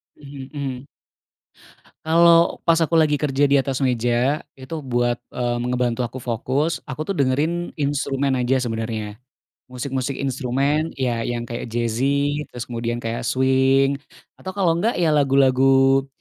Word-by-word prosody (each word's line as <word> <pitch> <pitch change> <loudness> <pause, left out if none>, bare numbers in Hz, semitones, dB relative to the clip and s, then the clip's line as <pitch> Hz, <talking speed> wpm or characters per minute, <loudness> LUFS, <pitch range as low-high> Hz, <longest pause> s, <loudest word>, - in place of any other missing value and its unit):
Mmm, 140 -2 -10
mhm. 140 -2 -5 1.2
Kalau 170 +1 +5
pas 165 0 +3
aku 165 +1 +2
lagi 155 -2 +3
kerja 145 -1 +1
di 140 -1 +4
atas 135 -1 -3
meja, 125 +2 +1 0.2
itu 135 +4 -7
buat, 120 -2 -1
eee, 120 -1 -2
me 125 - -2
ngebantu 125 -1 0
aku 125 +2 -4
fokus, 130 +6 -2
aku, 150 +4 -4
tuh, 195 - -2
dengerin 155 +4 0
instrumen 140 -1 0
aja 130 +1 +1
sebenarnya, 110 -3 -4 0.5
musik-musik 130 +1 -3
instrumen, 140 +4 -1
ya, 120 -4 -1
yang 120 -1 -2
kayak 120 0 -6
jazzy, 135 +6 -1
terus 120 0 -8
kemudian 120 0 -3
kayak 115 +1 -3
swing, 135 +1 +2 0.4
atau 190 +1 -7
kalau 170 -4 +2
nggak, 230 +6 +1
ya, 170 -3 +2
lagu-lagu, 135 -1 +4
135 Hz, 140 wpm, -22 LUFS, 120-145 Hz, 1.2 s, Kalau